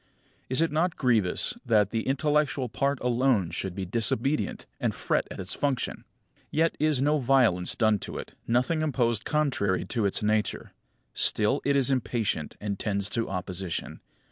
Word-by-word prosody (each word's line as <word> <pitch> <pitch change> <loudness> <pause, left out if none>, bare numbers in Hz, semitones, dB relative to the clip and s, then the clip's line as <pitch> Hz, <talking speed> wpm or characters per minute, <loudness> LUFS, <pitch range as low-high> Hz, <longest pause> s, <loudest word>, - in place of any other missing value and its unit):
Is 130 +4 +3
it 165 - +2
not 165 +3 +1
grievous 115 -9 +2
that 105 -3 +3
the 115 -1 -2
intellectual 140 -1 +1
part 140 +3 0
alone 120 -7 +2
should 90 +1 -4
be 95 -1 -3
disobedient, 115 +8 0
and - - -1
fret - - 0
at - - -8
its 95 0 -1
function? 140 -3 -2 0.4
Yet 160 +2 +1
is 150 -3 +2
no 150 +1 +2
violence 120 -9 +2
done 110 -3 +2
to - - -7
it, - - -8
nothing 125 +7 +1
imposed 120 -7 0
contrary 130 - 0
to 115 -5 0
its 100 - -2
nature. 105 0 0 0.4
Still 110 +7 +1
it 140 0 +2
is 135 -1 +3
impatient, 115 - -1
and 100 -1 -4
tends 100 -1 -2
to 115 -1 -1
opposition. 90 -1 -4
120 Hz, 160 wpm, -27 LUFS, 100-140 Hz, 0.4 s, Is